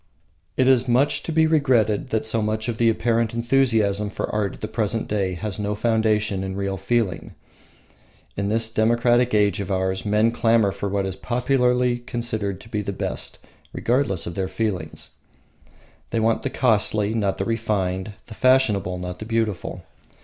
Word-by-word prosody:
It 130 - +3
is 130 -2 +4
much 125 +4 +2
to - - -5
be 160 0 +4
regretted 130 -6 +2
that 110 -3 -1
so 110 0 0
much 110 +2 -2
of 115 -2 -3
the 115 -1 +4
apparent 115 0 0
enthusiasm 115 -5 +2
for - - -3
art 105 -2 -1
at - - -18
the 110 - -3
present 110 0 -1
day 95 -3 -1
has 100 +3 -4
no 105 0 -1
foundation 105 -3 +1
in 95 0 -4
real 100 0 -2
feeling. 100 -1 -1 1.0
In 100 0 -2
this 115 +1 0
democratic 120 +1 +3
age 105 0 +2
of 100 - -4
ours 95 0 -1
men 105 +2 +2
clamour 115 -3 +3
for 100 +1 -4
what 100 0 -1
is 95 -1 -4
popularly 125 +1 +1
considered 115 -5 -3
the 105 -2 -4
best, 95 - -4 0.4
regardless 120 -8 0
of 85 - -5
their 95 +1 -2
feelings. 95 -7 -4 1.0
They 115 - -1
want 110 0 +1
the - - -2
costly, 105 0 +1
not 100 -4 0
the - - -2
refined; 105 -4 -1
the 110 - -10
fashionable, 110 -8 +2
not 90 0 -6
the 110 - -6
beautiful. 110 -4 -2
110 Hz, 165 wpm, -23 LUFS, 100-120 Hz, 1.0 s, is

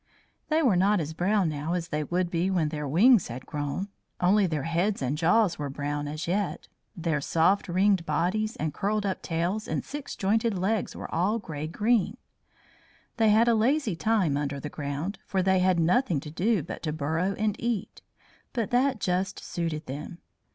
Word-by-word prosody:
They 320 +1 +2
were 235 -9 +4
not 200 +3 +3
as 160 -1 -3
brown 190 +3 +1
now 155 +2 -2
as 175 -2 -2
they 150 -1 -1
would 175 +2 -1
be 175 +2 +1
when 170 -5 +1
their 150 -1 -4
wings 205 - +5
had 125 +2 -7
grown. 150 +6 -3 0.3
Only 195 +2 +4
their 155 -5 -2
heads 175 +6 0
and 135 +1 -1
jaws 175 +3 +2
were 145 -1 -3
brown 145 +1 -3
as 155 +3 -5
yet; 195 +2 -1 0.3
their 160 -4 -1
soft 170 +8 +2
ringed 190 +1 +2
bodies 185 +8 0
and 155 -1 -3
curled 205 +4 -1
up 190 -2 -2
tails 175 +6 -2
and - - -2
six 290 -1 -6
jointed 220 +1 +1
legs 200 +3 -1
were - - -7
all 190 +7 +1
grey 155 -8 -5
green. 210 +4 +1 1.0
They 225 -2 +4
had 220 +3 +5
a 235 - +5
lazy 230 - +2
time 185 -7 +1
under 140 -1 -2
the 150 - -5
ground, 150 +7 -4
for 190 -1 0
they 190 0 +3
had 185 -1 +3
nothing 175 - +2
to 150 - -8
do 195 +2 +1
but - - -7
to 155 - -2
burrow 160 +6 -1
and 210 -1 0
eat; 230 -4 -3 0.5
but 230 -5 -2
that 255 0 +2
just 185 0 -1
suited 165 -3 -4
them. 145 +6 -7
180 Hz, 185 wpm, -27 LUFS, 155-210 Hz, 1.0 s, wings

